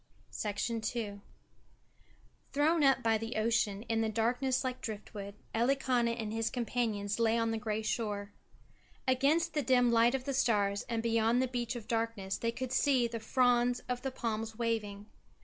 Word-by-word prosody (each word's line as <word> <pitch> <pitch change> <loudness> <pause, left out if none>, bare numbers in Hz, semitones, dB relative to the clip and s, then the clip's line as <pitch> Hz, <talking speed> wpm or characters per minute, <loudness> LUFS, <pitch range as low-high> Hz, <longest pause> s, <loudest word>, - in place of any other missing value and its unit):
II 220 -3 -3 1.3
Thrown 305 +2 +3
up 270 -2 +4
by 225 -1 +3
the 225 +2 -5
ocean 215 -2 +1
in 225 -1 0
the 220 - +1
darkness 245 +4 0
like 255 -1 -3
driftwood, 205 -2 -6 0.2
Elikana 240 -1 +1
and 215 -1 -3
his 225 0 0
companions 225 -4 -1
lay 230 0 +3
on 230 0 +1
the 225 - -2
grey 215 0 -2
shore. 205 -3 -2 0.8
Against 300 +6 +2
the 300 - +1
dim 245 -3 +3
light 235 +2 +4
of 265 - -3
the 275 +1 -2
stars 205 -6 +2
and 230 -1 -1
beyond 230 +1 +2
the 260 - +2
beach 245 -1 -3
of 230 -3 -7
darkness 225 -4 -2
they 230 - 0
could 255 +1 -5
see 260 -2 +3
the 230 0 -5
fronds 245 +1 +2
of 250 0 -2
the 270 - -2
palms 225 -3 -3
waving. 215 -4 -2
230 Hz, 165 wpm, -32 LUFS, 220-250 Hz, 1.3 s, up